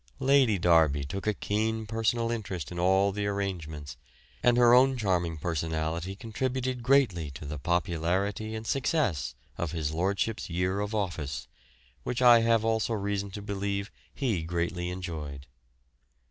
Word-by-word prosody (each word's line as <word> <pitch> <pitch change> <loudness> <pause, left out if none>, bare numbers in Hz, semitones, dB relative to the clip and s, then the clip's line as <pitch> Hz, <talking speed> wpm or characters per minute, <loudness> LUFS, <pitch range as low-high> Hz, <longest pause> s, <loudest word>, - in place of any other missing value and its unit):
Lady 130 - +4
Derby 80 -5 +4
took 95 +9 -5
a 105 - +3
keen 110 +2 -1
personal 115 +2 0
interest 95 - -4
in 85 - -5
all 95 +2 +3
the 100 +1 -2
arrangements, 85 -8 -4 0.4
and 120 0 +4
her 120 -1 +6
own 130 +1 +5
charming 90 -7 0
personality 80 +2 -2
contributed 125 +3 -2
greatly 120 - +3
to 70 +2 -9
the 75 0 -5
popularity 90 +6 -1
and 110 0 -6
success 105 - 0 0.2
of 85 -2 -2
his 80 -3 -2
lordship's 95 +7 -1
year 90 +3 0
of 105 +1 -2
office, 80 -10 -3 0.5
which 120 - -3
I 120 -2 +8
have 115 -1 +2
also 115 0 +1
reason 100 -1 -2
to 100 +1 -7
believe 100 0 -3 0.2
he 115 - -1
greatly 85 +1 -2
enjoyed. 80 -7 -6
100 Hz, 145 wpm, -28 LUFS, 85-110 Hz, 0.5 s, I